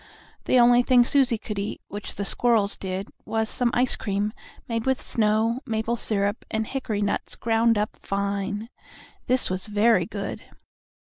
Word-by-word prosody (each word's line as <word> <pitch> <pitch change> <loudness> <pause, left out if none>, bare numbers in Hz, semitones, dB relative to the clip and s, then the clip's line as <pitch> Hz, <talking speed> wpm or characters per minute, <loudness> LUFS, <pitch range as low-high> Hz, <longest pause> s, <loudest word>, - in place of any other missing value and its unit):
The - - +3
only 240 0 +6
thing 245 -1 +5
Susie 260 -3 +3
could 210 -1 -5
eat 200 - -4
which 205 -1 -5
the 200 - -3
squirrels 220 -2 +2
did 190 +1 -4 0.2
was 220 0 -1
some 245 -1 +1
ice 250 +1 +2
cream, 205 0 -2 0.3
made 230 +1 -2
with 265 -1 +2
snow, 220 +2 +1
maple 225 -1 -1
syrup 205 -2 0
and 220 0 -1
hickory 220 -5 -2
nuts 205 - -2
ground 230 0 +2
up 210 +2 -1
fine. 200 +2 -3 0.6
This 255 -5 +2
was 185 +3 -3
very 210 -3 +3
good. 200 -1 -5
220 Hz, 160 wpm, -25 LUFS, 205-235 Hz, 0.6 s, only